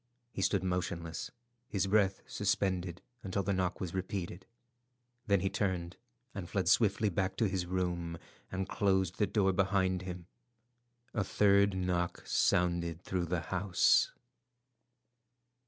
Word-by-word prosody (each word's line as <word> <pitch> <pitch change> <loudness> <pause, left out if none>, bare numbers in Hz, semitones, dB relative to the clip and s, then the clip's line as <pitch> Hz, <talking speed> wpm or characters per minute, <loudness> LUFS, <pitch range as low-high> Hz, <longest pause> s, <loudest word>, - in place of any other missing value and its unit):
He 95 - -4
stood 95 -1 +2
motionless, 85 -3 -2 0.4
his 100 -4 0
breath 95 -1 +2
suspended 95 -3 -1 0.2
until 100 -1 -2
the 100 +2 0
knock 90 -1 -1
was 90 -3 -4
repeated. 95 -1 -4 0.8
Then 100 -3 +3
he 95 - +1
turned 95 -3 -1 0.4
and 95 -3 -6
fled 95 -2 -1
swiftly 105 +2 +4
back 95 +1 -1
to 110 - +2
his 95 -2 -2
room, 90 -2 -2 0.3
and 95 0 -2
closed 95 -4 +1
the 105 - +3
door 95 -3 +2
behind 95 -1 +1
him. 90 -2 -6 0.9
A 110 - +1
third 100 0 +4
knock 90 -1 -1
sounded 85 -1 +1
through 90 -2 -2
the 85 0 -1
house. 90 +2 +3
95 Hz, 130 wpm, -33 LUFS, 90-100 Hz, 0.9 s, swiftly